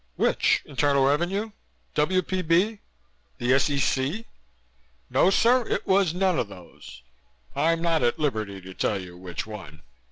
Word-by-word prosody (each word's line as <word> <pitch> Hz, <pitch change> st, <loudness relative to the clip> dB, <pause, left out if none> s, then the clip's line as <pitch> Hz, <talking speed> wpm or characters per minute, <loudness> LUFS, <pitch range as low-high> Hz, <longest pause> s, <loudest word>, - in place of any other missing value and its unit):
"Which? -, -, +2 dB
Internal 140 Hz, 0 st, +2 dB
Revenue? 175 Hz, +10 st, 0 dB, 0.4 s
W.P.B.? 185 Hz, +4 st, +1 dB, 0.6 s
The 120 Hz, +1 st, +1 dB
S.E.C?" 140 Hz, -, +1 dB, 0.9 s
"No 180 Hz, -, +4 dB
sir, 240 Hz, +4 st, +3 dB
it -, -, -2 dB
was 190 Hz, -3 st, +2 dB
none 185 Hz, -1 st, +1 dB
of -, -, -1 dB
those. 85 Hz, -10 st, -13 dB, 0.5 s
I'm 165 Hz, +4 st, +1 dB
not 165 Hz, -2 st, +2 dB
at 120 Hz, -1 st, +1 dB
liberty 110 Hz, -10 st, -2 dB
to 95 Hz, +1 st, -10 dB
tell 100 Hz, +2 st, -1 dB
you 90 Hz, -2 st, -10 dB
which 90 Hz, -2 st, -6 dB
one. 85 Hz, -8 st, -10 dB
145 Hz, 130 wpm, -25 LUFS, -, 0.9 s, No